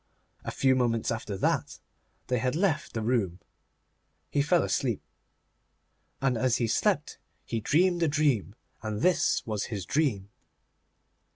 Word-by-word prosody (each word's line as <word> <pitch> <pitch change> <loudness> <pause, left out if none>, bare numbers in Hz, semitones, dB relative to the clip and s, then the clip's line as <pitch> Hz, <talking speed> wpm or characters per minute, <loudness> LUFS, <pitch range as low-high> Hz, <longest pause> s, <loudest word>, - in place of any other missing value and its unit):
A - - -4
few 130 -1 +2
moments 120 -3 +1
after 110 -3 -3
that - - 0 0.5
they 125 -1 0
had 125 +4 0
left 170 -3 0
the 110 - -1
room, 105 -7 0 0.9
he 145 - +2
fell 160 +4 +3
asleep. 120 -6 -1 1.2
And 130 -4 +1
as 130 -1 +2
he 120 - +1
slept 115 - 0 0.3
he 115 - -2
dreamed 175 - +2
a 165 - +4
dream, 145 -9 +1 0.3
and 110 -1 -3
this 165 -6 +2
was 105 -2 -2
his 100 -5 -5
dream. 105 - 0
125 Hz, 135 wpm, -28 LUFS, 110-145 Hz, 1.2 s, a